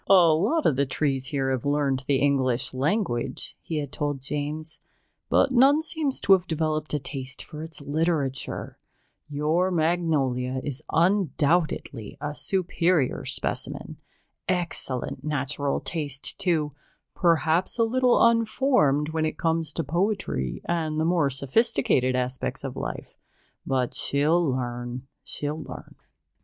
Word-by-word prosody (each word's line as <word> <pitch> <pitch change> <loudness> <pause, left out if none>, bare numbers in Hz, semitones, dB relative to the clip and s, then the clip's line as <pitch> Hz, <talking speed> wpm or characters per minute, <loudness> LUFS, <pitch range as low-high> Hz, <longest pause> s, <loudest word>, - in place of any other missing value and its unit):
"A 175 -5 +7
lot 220 - +1
of 135 - +3
the 140 0 +2
trees 135 -1 -1
here 135 -3 0
have 130 -3 -1
learned 140 -2 0
the 140 - +3
English 130 -3 +1
language," 135 - -1
he 160 - -4
had 145 -3 -3
told 145 -2 -2
James, 150 +3 -4 0.5
"but - - +4
none 270 +4 +6
seems 315 -4 -1
to 195 - +6
have 180 -2 +3
developed 155 -1 -1
a - - 0
taste 130 -1 -5
for 155 -2 -9
its 160 -2 -8
literature. 145 -2 -2 0.5
Your 155 +5 +1
Magnolia 155 -7 +1
is 145 -1 -4
undoubtedly 165 - +1
a 150 0 -3
superior 175 -4 0
specimen. - - -3 0.5
Excellent 170 -8 -1
natural 145 -1 -1
taste, 145 -2 -3
too 165 -6 +1 0.4
perhaps 170 +1 +2
a 230 - +4
little 250 +1 +4
unformed 230 - +3
when 160 0 0
it - - -5
comes 165 -1 0
to - - -2
poetry 145 - -1
and 160 -2 -1
the 160 - +1
more 165 -4 +3
sophisticated 135 - +1
aspects 125 0 -2
of - - -5
life, - - -6 0.5
but 130 -2 0
she'll 155 +5 +2
learn, 125 -2 -3 0.2
she'll 150 +2 -3
learn." - - -9
150 Hz, 130 wpm, -26 LUFS, 135-175 Hz, 0.5 s, A